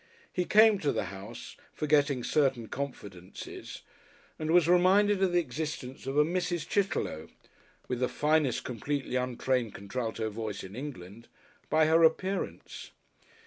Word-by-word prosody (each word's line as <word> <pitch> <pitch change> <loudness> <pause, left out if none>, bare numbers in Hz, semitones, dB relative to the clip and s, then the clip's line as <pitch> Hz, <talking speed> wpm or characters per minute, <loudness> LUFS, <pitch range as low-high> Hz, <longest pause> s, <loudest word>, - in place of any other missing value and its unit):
He 180 - 0
came 215 0 +6
to 145 - +1
the - - -1
house, 95 +1 -9 0.2
forgetting 145 -4 +2
certain 135 -6 +1
confidences, 100 -10 -7 0.6
and 155 0 -3
was 170 -1 +5
reminded 190 +3 +4
of 190 -2 +3
the 175 - +2
existence 140 -3 -5
of 135 +2 -2
a 150 - +6
Mrs. 175 0 -2
Chitterlow 190 - -1 0.6
(with 125 -1 -2
the 125 - +1
finest 150 -4 +1
completely 130 +2 -3
untrained 125 -2 -1
Contralto 110 +1 -3
voice 105 -2 -5
in 95 +2 -9
England) 115 -5 -8 0.4
by 155 +1 +4
her 165 +1 +4
appearance. 185 +4 -1
140 Hz, 135 wpm, -29 LUFS, 120-165 Hz, 0.6 s, came